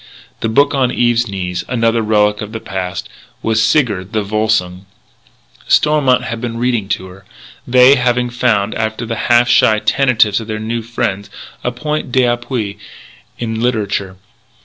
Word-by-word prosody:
The 115 - -1
book 140 +6 +3
on 130 -3 +1
Eve's 120 -1 +1
knees 90 -3 -4
another 115 -2 +1
relic 105 -1 +1
of 105 +1 -7
the 115 - -4
past 95 -3 -5 0.4
was 110 -1 +1
Sigurd 110 -8 +1
the 110 -1 0
Volsung. 100 -3 -1 0.8
Stormont 145 -4 +3
had 115 -1 -5
been 120 -1 -4
reading 120 -5 -1
to 95 - -2
her 95 +1 -15 0.4
they 125 +2 +6
having 125 0 0
found, 110 -4 +1
after 110 +1 -3
the 115 0 -3
half 120 0 +5
shy 110 -2 +4
tentatives 110 -4 +2
of 110 -1 -9
new 110 +2 -3
friends, 100 -3 -3 0.3
a 125 - -1
point 150 +2 -4
d'appui 120 -4 -1 0.6
in 115 -1 -3
literature. 105 -5 -1
115 Hz, 150 wpm, -16 LUFS, 105-125 Hz, 0.8 s, they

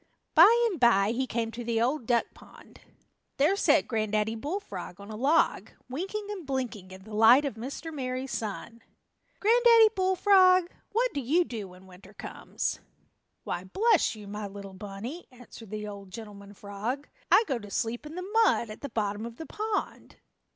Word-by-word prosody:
By 340 +7 +9 0.2
and 355 - -5
by 215 -4 +4
he 260 +3 -1
came 230 -1 -2
to 240 +2 -7
the 230 -1 0
Old 245 +1 0
Duck 235 -2 +3
Pond. - - -17 0.6
There 295 +8 +3
sat - - +3
Granddaddy 215 -1 0
Bullfrog 225 - -6
on 200 +2 -10
a - - -6
log, 285 +8 +2 0.2
winking 390 +10 -4
and 390 -4 -6
blinking 250 -9 -4
in 190 0 -12
the 215 +1 -12
light 230 +7 +6
of 280 - -2
Mr. 270 +8 -7
Merry 255 -2 -3
Sun. 230 -1 -5 0.6
"Granddaddy 460 0 +6
Bullfrog, 370 -1 +4 0.2
what 475 +1 +1
do 285 - -2
you 310 +8 +2
do 225 - -6
when 180 +1 -15
winter 190 +2 -16
comes?" - - -4 0.6
"Why, 175 - -4
bless 405 - +2
you, 210 -2 -11
my 210 +1 -5
little 200 -1 -9
bunny," 205 - -8
answered 245 -3 -13
the 210 0 -5
old 200 -2 -9
gentleman 205 0 -10
frog, 215 +9 -5 0.2
"I - - +7
go 265 - -2
to 205 -2 -11
sleep 230 +6 -2
in 310 - -9
the 365 - -4 0.2
mud 235 - +2
at 215 - -10
the 280 - -5
bottom 210 -2 -2
of 235 - -10
the 320 - -8
pond." 430 +3 -4
235 Hz, 175 wpm, -28 LUFS, 210-325 Hz, 0.6 s, By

